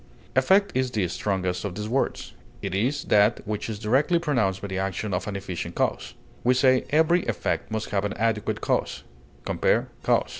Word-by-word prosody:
Effect 190 Hz, +10 st, +4 dB
is 130 Hz, 0 st, +1 dB
the 105 Hz, -6 st, 0 dB
strongest 90 Hz, 0 st, -2 dB
of 100 Hz, -4 st, -4 dB
these 105 Hz, +1 st, -4 dB
words; 130 Hz, +5 st, -1 dB, 0.3 s
it -, -, -3 dB
is 125 Hz, +9 st, 0 dB
that 105 Hz, +2 st, +3 dB
which 105 Hz, +1 st, -3 dB
is 110 Hz, -, -4 dB
directly 130 Hz, -, +2 dB
produced 120 Hz, -, 0 dB
by -, -, -2 dB
the 95 Hz, -1 st, -3 dB
action 95 Hz, +1 st, -2 dB
of 90 Hz, +4 st, -2 dB
an 105 Hz, -, -3 dB
efficient 95 Hz, -3 st, -5 dB
cause; -, -, -1 dB, 0.3 s
we 125 Hz, +1 st, +4 dB
say, 130 Hz, 0 st, +4 dB
"Every 160 Hz, +4 st, +3 dB
effect 115 Hz, -5 st, -1 dB
must 110 Hz, 0 st, -3 dB
have 100 Hz, -1 st, +1 dB
an 105 Hz, -, -2 dB
adequate 115 Hz, +1 st, -1 dB
cause" -, -, -1 dB, 0.4 s
(compare -, -, +1 dB
CAUSE). -, -, +2 dB
110 Hz, 185 wpm, -25 LUFS, 100-130 Hz, 0.4 s, Effect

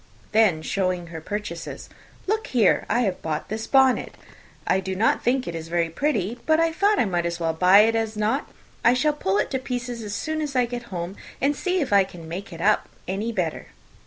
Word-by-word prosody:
Then 210 Hz, -8 st, +3 dB
showing 185 Hz, -2 st, -1 dB
her 160 Hz, -, -6 dB
purchases, 185 Hz, -2 st, -5 dB, 0.4 s
"Look 435 Hz, +3 st, -1 dB
here, 230 Hz, -7 st, +3 dB
I 235 Hz, +4 st, +2 dB
have 195 Hz, -6 st, -1 dB
bought 155 Hz, -1 st, -3 dB
this 220 Hz, +2 st, -4 dB
bonnet. 265 Hz, -2 st, +3 dB, 0.5 s
I 190 Hz, -, +2 dB
do 190 Hz, 0 st, -4 dB
not 220 Hz, +4 st, +2 dB
think 255 Hz, +2 st, +1 dB
it 170 Hz, -, -3 dB
is 165 Hz, -1 st, -6 dB
very 170 Hz, -1 st, 0 dB
pretty; 235 Hz, -, -1 dB
but 315 Hz, 0 st, +4 dB
I 330 Hz, 0 st, +3 dB
thought 405 Hz, +5 st, +2 dB
I -, -, +3 dB
might 175 Hz, -3 st, 0 dB
as 170 Hz, 0 st, -4 dB
well 165 Hz, -1 st, 0 dB
buy 185 Hz, +5 st, +6 dB
it 225 Hz, +1 st, +3 dB
as 225 Hz, -1 st, -1 dB
not. 220 Hz, +7 st, 0 dB, 0.3 s
I 235 Hz, +2 st, +5 dB
shall 300 Hz, +4 st, +2 dB
pull 195 Hz, -9 st, 0 dB
it 210 Hz, -, 0 dB
to 265 Hz, -, 0 dB
pieces 245 Hz, -2 st, -4 dB
as 205 Hz, -2 st, -5 dB
soon 315 Hz, 0 st, -2 dB
as 290 Hz, -3 st, -4 dB
I 250 Hz, -1 st, +4 dB
get 240 Hz, 0 st, -6 dB
home, 180 Hz, +1 st, -5 dB, 0.2 s
and 285 Hz, +2 st, +1 dB
see 365 Hz, +3 st, 0 dB
if 265 Hz, -8 st, -1 dB
I 200 Hz, -1 st, +7 dB
can 175 Hz, -3 st, -11 dB
make 185 Hz, +5 st, -6 dB
it 165 Hz, -1 st, -8 dB
up 215 Hz, +3 st, +2 dB, 0.2 s
any 200 Hz, +5 st, -2 dB
better." 180 Hz, -7 st, -2 dB
215 Hz, 220 wpm, -24 LUFS, 180-255 Hz, 0.5 s, I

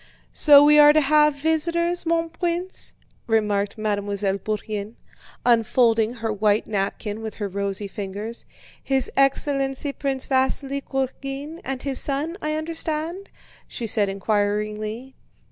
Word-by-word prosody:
"So 290 Hz, -2 st, +8 dB
we 300 Hz, +1 st, +6 dB
are 295 Hz, 0 st, +8 dB
to 310 Hz, -, +5 dB
have 300 Hz, +1 st, +4 dB
visitors, 335 Hz, +3 st, 0 dB
mon 330 Hz, 0 st, +1 dB
prince?" 350 Hz, +2 st, -2 dB, 0.3 s
remarked 210 Hz, -3 st, 0 dB
Mademoiselle 205 Hz, -2 st, -1 dB
Bourienne, 215 Hz, +1 st, -4 dB, 0.5 s
unfolding 230 Hz, -1 st, +3 dB
her 230 Hz, -2 st, -3 dB
white 210 Hz, +1 st, +1 dB
napkin 205 Hz, +1 st, -3 dB
with 220 Hz, -1 st, -6 dB
her 205 Hz, -, -3 dB
rosy 200 Hz, +1 st, -3 dB
fingers. 205 Hz, +3 st, -6 dB, 0.4 s
"His 265 Hz, -2 st, 0 dB
Excellency 275 Hz, 0 st, +1 dB
Prince 270 Hz, -2 st, -1 dB
Vasíli 270 Hz, +1 st, 0 dB
Kurágin 275 Hz, +3 st, -4 dB
and 265 Hz, -1 st, -5 dB
his 275 Hz, -2 st, -1 dB
son, 295 Hz, +4 st, -1 dB
I 305 Hz, 0 st, -1 dB
understand?" 325 Hz, +3 st, -4 dB, 0.4 s
she 235 Hz, -, -6 dB
said 210 Hz, -2 st, +1 dB
inquiringly. 210 Hz, +4 st, -2 dB
260 Hz, 125 wpm, -23 LUFS, 210-295 Hz, 0.5 s, So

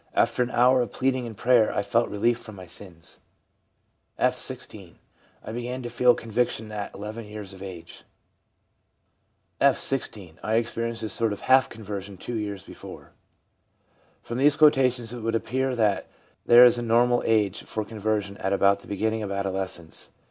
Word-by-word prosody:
After 120 Hz, +2 st, +2 dB
an 125 Hz, -, +1 dB
hour 125 Hz, +1 st, +4 dB
of 120 Hz, -, -3 dB
pleading 130 Hz, -2 st, -1 dB
and 110 Hz, -3 st, -9 dB
prayer 120 Hz, -3 st, +4 dB
I 100 Hz, -, -1 dB
felt 115 Hz, +2 st, +1 dB
relief 115 Hz, +4 st, +1 dB
from 110 Hz, -3 st, -11 dB
my 95 Hz, -1 st, -10 dB
sins/ 85 Hz, -2 st, -11 dB, 1.0 s
F., -, -, +2 dB
16. -, -, -8 dB, 0.5 s
'I -, -, -7 dB
began 120 Hz, +2 st, -4 dB
to 120 Hz, -, -5 dB
feel 125 Hz, +1 st, +4 dB
conviction 115 Hz, -1 st, -2 dB
at 105 Hz, -1 st, -5 dB
11 105 Hz, +3 st, -7 dB
years 105 Hz, -2 st, -8 dB
of 95 Hz, -, -13 dB
age/ 90 Hz, -4 st, -9 dB, 1.6 s
F, -, -, +4 dB
16. 100 Hz, -10 st, -4 dB
' -, -, -27 dB
I 110 Hz, -, 0 dB
experienced 115 Hz, 0 st, -2 dB
a 110 Hz, -, -3 dB
sort 115 Hz, -1 st, 0 dB
of 105 Hz, -, -5 dB
half 130 Hz, 0 st, +4 dB
conversion 100 Hz, -3 st, -7 dB
two 120 Hz, -, -7 dB
years 100 Hz, -3 st, -4 dB
before/ -, -, -11 dB, 1.1 s
From 120 Hz, +2 st, -4 dB
these 145 Hz, +2 st, +4 dB
quotations 130 Hz, -6 st, +3 dB
it 120 Hz, -, -6 dB
would 115 Hz, 0 st, -1 dB
appear 130 Hz, +3 st, -1 dB
that 105 Hz, -4 st, +1 dB, 0.4 s
there 120 Hz, +1 st, +9 dB
is 120 Hz, 0 st, +4 dB
a -, -, -3 dB
normal 120 Hz, +1 st, +3 dB
age 105 Hz, -3 st, +1 dB
for 110 Hz, -1 st, -4 dB
conversion 105 Hz, -2 st, -2 dB
at 95 Hz, +1 st, -1 dB
about 100 Hz, 0 st, +3 dB
the -, -, -15 dB
beginning 110 Hz, +2 st, -1 dB
of 100 Hz, -2 st, -4 dB
adolescence. 95 Hz, -4 st, -4 dB
110 Hz, 170 wpm, -25 LUFS, 100-120 Hz, 1.6 s, there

